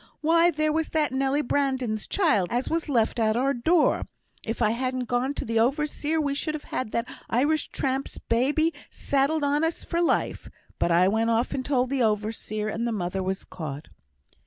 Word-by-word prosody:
Why, 335 +2 +4
there 310 -2 0
was 320 0 0
that 310 -2 +1
Nelly 270 +2 +1
Brandon's 260 -6 -1
child 255 - +2
as 245 +2 -1
was 330 -1 -1
left 235 -3 +1
at 220 0 +2
our 270 +3 +2
door, 310 +7 +2 0.4
if 225 - -4
I 215 -3 +3
hadn't 255 +2 -2
gone 245 +4 -1
to - - -3
th' 230 0 -1
overseer 300 +5 0
we 285 -2 0
should 305 +2 -2
have 300 - -7
had 255 - -2
that 230 +2 -2 0.2
Irish 290 +6 +1
tramp's 270 0 -2
babby 295 +8 +1 0.2
saddled 285 +3 0
on 290 +2 +1
us 325 +1 -1
for 340 0 -1
life; 345 - 0 0.3
but - - +2
I 175 +2 +5
went 220 +3 +1
off 230 +2 +1
and 260 - -2
told 255 -2 0
th' 275 -2 0
overseer, 215 -1 -1
and 230 +2 -2
th' 235 - -1
mother 185 0 -2
was 190 +1 -3
caught." 150 -3 -7
260 Hz, 190 wpm, -26 LUFS, 225-300 Hz, 0.4 s, I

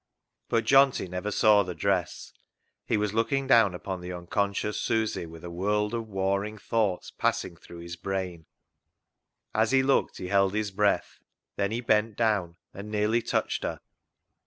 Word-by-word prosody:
But 115 0 +2
Johnty 135 -3 +4
never 90 +3 -4
saw 105 0 +5
the 90 -3 -4
dress. 95 -6 -1 0.5
He 110 - +2
was 105 -1 -1
looking 135 +5 +1
down 110 -8 +5
upon 95 0 -5
the 90 +1 -6
unconscious 100 +4 -2
Susy 110 -6 -1
with 80 0 -12
a 85 - -7
world 105 +5 0
of 115 -1 -3
warring 100 +1 -1
thoughts 105 -3 -1
passing 90 - -1
through 85 +1 -12
his 85 +1 -7
brain. 90 -3 -4 1.1
As 110 0 +2
he 135 0 +4
looked 135 +1 +1
he 90 - -6
held 100 0 +3
his 105 -1 -1
breath. 100 +1 0 0.4
Then 100 -1 0
he 115 +3 -2
bent 110 -2 +1
down 105 -7 +1 0.2
and 100 +2 -8
nearly 105 +2 +1
touched - - -1
her. - - -3
100 Hz, 160 wpm, -27 LUFS, 90-110 Hz, 1.1 s, saw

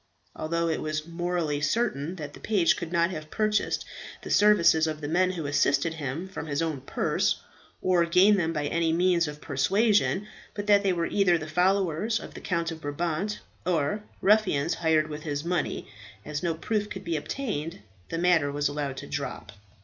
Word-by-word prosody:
Although 170 +1 -1
it 160 - -1
was 155 0 -3
morally 170 -3 -2
certain 175 -4 0
that 150 -4 -7
the - - -12
page 195 -6 +2
could 170 -2 -6
not 170 0 +2
have 155 -3 -7
purchased 215 +2 0 0.4
the - - -6
services 170 -6 +5
of 155 -1 -3
the 145 - -5
men 180 +4 +2
who 165 -4 -4
assisted 145 +2 +2
him, 160 +3 -4
from 190 -4 -7
his 145 -1 -2
own 160 -5 -1
purse, - - 0 0.4
or 180 -2 +4
gain 185 +5 +5
them 170 -4 0
by 150 -3 -2
any 165 +2 +1
means 175 0 +3
of 150 0 -7
persuasion, 195 - +2 0.3
but 205 -1 -4
that 205 -1 +5
they 195 -1 +2
were 170 -2 0
either 185 -3 +3
the 155 - -6
followers 190 +5 +1
of - - -10
the - - -9
Count 170 -2 -1
of 160 -1 -8
Brabant, 165 +7 -2 0.2
or 170 +3 0 0.2
ruffians 185 -7 +3
hired 160 -2 +2
with 150 0 -6
his 145 -1 -3
money, 175 0 -1 0.4
as 150 -1 -4
no 170 -2 0
proof 210 +5 -2
could 190 -1 -7
be 170 -3 -2
obtained, 160 - -4 0.3
the 165 - -3
matter 170 -4 +3
was 145 0 0
allowed 145 -2 -3
to - - -7
drop. 140 -6 -5
165 Hz, 190 wpm, -27 LUFS, 150-185 Hz, 0.4 s, services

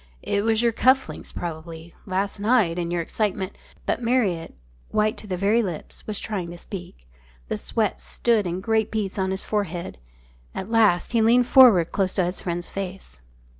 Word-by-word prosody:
"It 200 0 0
was 225 +1 +2
your 235 - +4
cuff 260 +3 +3
links - - -7
probably. 165 0 -7
Last 195 +2 -1
night 205 -6 +2
in 170 -1 -2
your 175 -1 -1
excitement 200 +1 -2
" - - -27
But - - -1
Marriott, 220 - 0 0.3
white 215 0 +1
to 215 - -9
the 185 -2 -2
very 205 +5 +3
lips, 180 -8 -6
was 210 -2 -3
trying 190 -6 -4
to 175 - -8
speak. 175 - -9 0.4
The - - -1
sweat 60 - -1
stood 205 - +1
in 175 +2 -3
great 220 +1 +1
beads 210 -3 -3
on 190 0 0
his 190 0 -2
forehead. 180 - -3 0.6
At 190 +4 -5
last 215 -6 +3
he 230 -2 +3
leaned 240 +3 +5
forward 230 -11 +7
close 190 -2 0
to 185 - +2
his 180 +1 -4
friend's 175 -1 -3
face. 190 - -7
195 Hz, 185 wpm, -24 LUFS, 175-220 Hz, 0.6 s, forward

